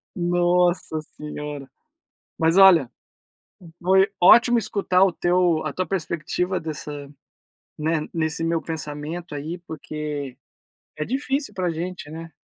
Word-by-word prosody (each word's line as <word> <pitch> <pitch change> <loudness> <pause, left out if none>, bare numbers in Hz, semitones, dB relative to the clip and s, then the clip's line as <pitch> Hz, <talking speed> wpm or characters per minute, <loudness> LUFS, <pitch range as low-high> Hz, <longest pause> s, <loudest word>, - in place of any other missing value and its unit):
Nossa 175 -1 +1 0.2
senhora, 150 -2 -7 0.7
mas, 165 +2 +2
olha, 175 -10 +7 0.9
foi 190 +3 +4
ótimo 235 +6 +7
escutar 195 -4 +2
o 195 - +4
teu 175 -2 +1
a 155 - -2
tua 185 - -1
perspectiva 180 +1 -2
dessa, 155 -2 -6 0.9
né, 155 0 0
nesse 160 -1 -2
meu 165 0 0
pensamento 155 +2 -6
aí, 155 +5 -5
porque 150 -3 -5 0.6
é 150 - -2
difícil 270 - -2
pra 180 -2 -1
gente, 170 -1 -5
né. 165 +1 -8
170 Hz, 115 wpm, -23 LUFS, 155-185 Hz, 0.9 s, olha